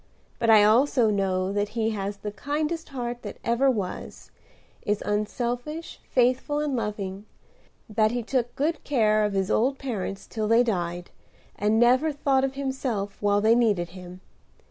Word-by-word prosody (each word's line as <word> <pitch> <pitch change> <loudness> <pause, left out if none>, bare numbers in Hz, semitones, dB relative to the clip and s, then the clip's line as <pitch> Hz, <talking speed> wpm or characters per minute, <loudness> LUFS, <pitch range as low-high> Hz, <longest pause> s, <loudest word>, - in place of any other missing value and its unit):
But 230 - +1
I 215 -2 +8
also 235 +1 +4
know 190 -1 0
that 205 0 0
he 225 0 +1
has 200 -1 -4
the 210 +1 -5
kindest 305 +7 -3
heart 245 -3 -4
that - - -7
ever 235 +4 +2
was; 205 -8 -4 0.5
is 210 0 -1
unselfish, 245 +9 -3
faithful 255 +4 +2
and 295 -3 -1
loving; 210 -3 -4 0.6
that 215 0 +2
he 240 +1 -2
took 245 0 -1
good 310 +3 -1
care 215 -6 +2
of 210 -1 0
his 195 -1 0
old 265 +5 +2
parents 205 -7 -4
till 220 -2 -3
they 230 +2 +5
died, 175 -5 -3 0.4
and 210 +2 +1
never 255 +6 +4
thought 275 -2 +1
of 270 0 -1
himself 260 -7 -3
while 205 0 +2
they 220 +2 +5
needed 210 -8 +2
him. 180 0 -11
225 Hz, 160 wpm, -26 LUFS, 205-260 Hz, 0.6 s, I